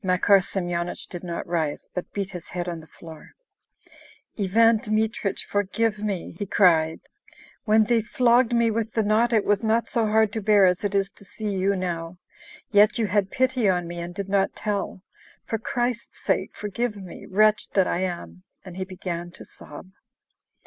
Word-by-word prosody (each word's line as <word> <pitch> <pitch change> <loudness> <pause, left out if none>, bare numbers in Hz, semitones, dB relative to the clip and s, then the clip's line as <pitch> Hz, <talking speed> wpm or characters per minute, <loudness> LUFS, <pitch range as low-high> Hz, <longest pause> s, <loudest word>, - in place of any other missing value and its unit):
Makar 185 +2 +4
Semyonich 175 -2 -3
did 175 -1 -7
not 170 -1 -4
rise, 160 -4 -2
but 180 - -5
beat 200 -1 -3
his 180 -3 -8
head 175 0 -4
on 170 -2 -4
the 160 - -14
floor. 160 -2 -13 1.0
"Ivan 225 +3 +4
Dmitrich, 215 -3 -1
forgive 210 +2 0
me!" 205 -4 -3
he 205 - -3
cried. 165 -5 +3 0.6
"When 220 0 +5
they 230 +1 +2
flogged 240 +2 +3
me 235 -1 +3
with 220 0 -2
the 220 - +1
knot 220 +3 +2
it 220 -3 +2
was 205 +1 +1
not 225 +1 +1
so 230 -2 +1
hard 215 -1 +3
to 220 - -2
bear 205 -1 +5
as 180 +1 +2
it 205 0 -1
is 195 0 +1
to - - -15
see 210 +2 -5
you 195 +1 +1
now... 175 -2 -4 0.5
yet 210 +1 +5
you 230 - +1
had 200 -1 +1
pity 255 -4 +1
on 180 -2 0
me, 175 0 -6
and 175 +1 -6
did 200 -1 -4
not 195 0 +1
tell. 200 -3 -3 0.4
For 225 - -2
Christ's 240 +1 -2
sake - - -1
forgive 210 +2 -3
me, 190 -3 -10
wretch 215 +3 +3
that 190 -2 +4
I - - -1
am!" 90 - -4 0.2
And 180 -1 -9
he 190 - -3
began 175 -2 -5
to - - -10
sob. 185 - -12
200 Hz, 185 wpm, -24 LUFS, 180-220 Hz, 1.0 s, When